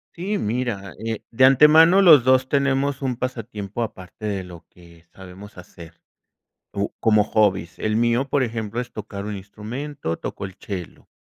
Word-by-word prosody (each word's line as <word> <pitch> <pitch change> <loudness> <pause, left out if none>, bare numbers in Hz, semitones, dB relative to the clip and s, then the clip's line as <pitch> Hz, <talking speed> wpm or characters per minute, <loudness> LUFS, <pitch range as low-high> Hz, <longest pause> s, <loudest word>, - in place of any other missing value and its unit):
Sí, 195 +4 -3
mira, 105 -4 -3
eh, 115 -1 -3
de 130 +3 +4
antemano 155 +7 +6
los 160 -9 +7
2 130 +1 +3
tenemos 140 0 0
un 130 -2 -1
pasatiempo 115 -3 -5
aparte 95 -1 -9
de 100 -3 -2
lo 90 -2 -12
que 85 -1 -19
sabemos 95 +2 -12
hacer, 85 -2 -14 0.7
u 100 0 -2
como 110 -2 +3
hobbies. 100 -5 0
El 110 0 -1
mío, 120 +4 +1
por 140 0 +1
ejemplo, 115 -1 -3
es 125 - -9
tocar 100 -2 -7
un 105 0 -4
instrumento, 105 - -6
toco - - -6
el 95 -2 -10
chelo. 95 -4 -8
110 Hz, 160 wpm, -22 LUFS, 100-130 Hz, 0.7 s, los